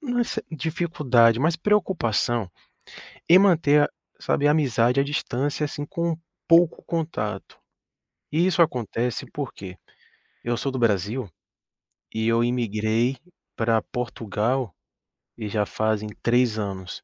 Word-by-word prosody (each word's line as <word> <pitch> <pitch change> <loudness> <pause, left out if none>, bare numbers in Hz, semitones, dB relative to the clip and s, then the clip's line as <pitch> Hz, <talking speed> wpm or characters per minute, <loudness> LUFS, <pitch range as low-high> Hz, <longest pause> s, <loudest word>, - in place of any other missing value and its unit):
não 275 -6 -4
uma 240 - +3
cer - - -4
dificuldade, 145 -7 +2
mais 160 +3 +2
preocupação 120 - 0 0.8
em 180 +3 +8
manter, 150 -6 +4 0.3
sabe, 145 - +1
a - - +5
amizade 125 -4 +2
à - - +4
distância, 145 +1 -2
assim, 145 0 -5
com 170 0 -2 0.3
pouco 170 0 +4
contato. 155 - -4 0.7
E 165 +4 +2
isso 185 -1 +2
acontece 125 - 0
porque 100 -10 -6 0.7
eu 120 0 0
sou 135 +3 -2
do 130 - -3
Brasil 110 +2 0 0.9
e 110 0 0
eu 115 +1 +3
imigrei 115 +1 0 0.4
pra 115 -1 +1
Portugal 115 0 -2 0.7
e 110 -3 -5
já 105 0 0
fazem 110 0 -1
3 120 -2 +2
anos. 95 -4 -5
125 Hz, 125 wpm, -24 LUFS, 110-155 Hz, 0.9 s, em